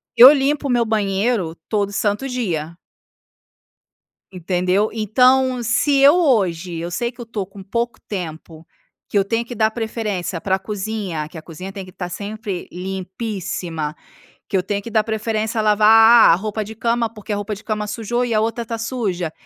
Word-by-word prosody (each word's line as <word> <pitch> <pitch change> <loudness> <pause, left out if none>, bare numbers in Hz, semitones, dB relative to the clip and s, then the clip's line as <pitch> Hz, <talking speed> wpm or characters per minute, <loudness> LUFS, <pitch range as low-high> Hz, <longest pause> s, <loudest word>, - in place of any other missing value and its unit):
eu 250 +3 +11
limpo 285 +1 0
o - - 0
meu 240 -1 +2
banheiro 205 -3 0 0.2
todo 205 -2 0
santo 210 +5 0
dia. 170 -11 -3 1.6
Entendeu? 185 +3 0
Então, 250 +4 +3
se 275 +4 +4
hoje 195 - +2
eu 170 +1 -4
sei 235 +6 -2
que 255 - -30
eu - - -4
estou 220 -4 -4
com 195 +1 -13
pouco 235 +4 -3
tempo, 165 -4 -7 0.4
que - - -1
eu 200 - +4
tenho 230 +4 -1
que 245 - -7
dar 220 -1 +2
preferência 215 -6 -3
pra 190 -1 +1
cozinha, 195 -5 -4
que 175 - -11
a - - -7
cozinha 180 +4 -8
tem 195 -1 -7
que 185 - -13
estar 180 0 -6
sempre 205 0 -5
limpíssima, 185 -4 -4 0.5
que 200 - 0
eu 185 - +2
tenho 200 +2 -3
que 230 - -8
dar 220 -1 +3
preferência 220 0 -2
a - - +1
lavar 220 +2 +7
a - - +7
roupa 215 +4 -3
de 215 +1 -8
cama, 230 +1 0
porque 215 -1 -7
a - - 0
roupa 205 +1 -3
de 205 - -13
cama 210 -1 -2
sujou 230 +3 -2
e 235 -2 -1
a 215 - +3
outra 230 +1 -2
tá 230 - -3
suja, 215 -8 -3
210 Hz, 180 wpm, -20 LUFS, 190-230 Hz, 1.6 s, eu